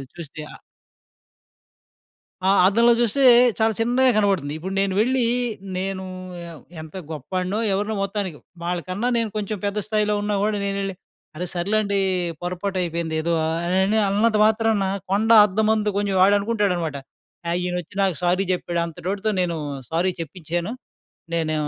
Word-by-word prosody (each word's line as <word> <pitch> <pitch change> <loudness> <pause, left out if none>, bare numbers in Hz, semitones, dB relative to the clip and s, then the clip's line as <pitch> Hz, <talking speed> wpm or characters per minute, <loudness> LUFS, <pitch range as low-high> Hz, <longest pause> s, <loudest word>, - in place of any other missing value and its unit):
చూస్తే 155 -2 -8
ఆహ్ - - -14 1.9
ఆ! - - +5 0.2
అద్దంలో 235 +4 +5
చూస్తే 240 +4 +1 0.4
చాలా 220 0 +3
చిన్నగా 250 +3 +3
కనపడుతుంది. 190 -9 +1
ఇప్పుడు 190 +3 -5
నేను 195 -1 +1
వెళ్ళీ, 255 +1 +1 0.5
నేనూ 190 0 -3 0.4
యవ్ 165 -5 -10 0.2
ఎంత 160 +3 -11 0.2
గొప్పాడినో, 185 - -3
ఎవరినో 210 +2 -1
మొత్తానికి. 195 -5 -3 0.3
వాళ్ళ 175 0 -1
కన్నా 200 +6 -2
నేను 230 -1 0
కొంచం 210 0 -3
పెద్ద 200 +1 -2
స్థాయిలో 210 -1 +1
ఉన్నా 205 0 -1
గూడా 210 0 0
నేనెళ్ళి 195 0 -2 0.4
"అరె 180 +3 -3
సర్లేండీ 200 +2 0 0.4
పొరపాటైపోయిందేదో" 170 -3 -2
ఆహ్, 160 +1 -1
అనని 190 +4 +2
అన్నంత 215 +2 +2
మాత్రాన 220 -2 +2 0.3
'కొండ 210 +3 +1 0.2
అర్ధమందు 215 +1 +1
కొంచెం,' 200 -1 0
వాడనుకుంటాడనమాట, 200 -5 +2 0.5
ఆ! - - 0
"ఈయనొచ్చి 180 0 -4
నాకు 185 -5 0
సారీ 185 +2 +2
జెప్పాడు. 175 -1 -2
అంతటోడితో 190 +6 -3
నేను 170 -2 -1 0.3
సారీ 175 +3 +1
చెప్పించ్చాను. 170 +4 -4 0.6
నేనూ 160 -2 0
195 Hz, 130 wpm, -23 LUFS, 175-215 Hz, 1.9 s, ఆ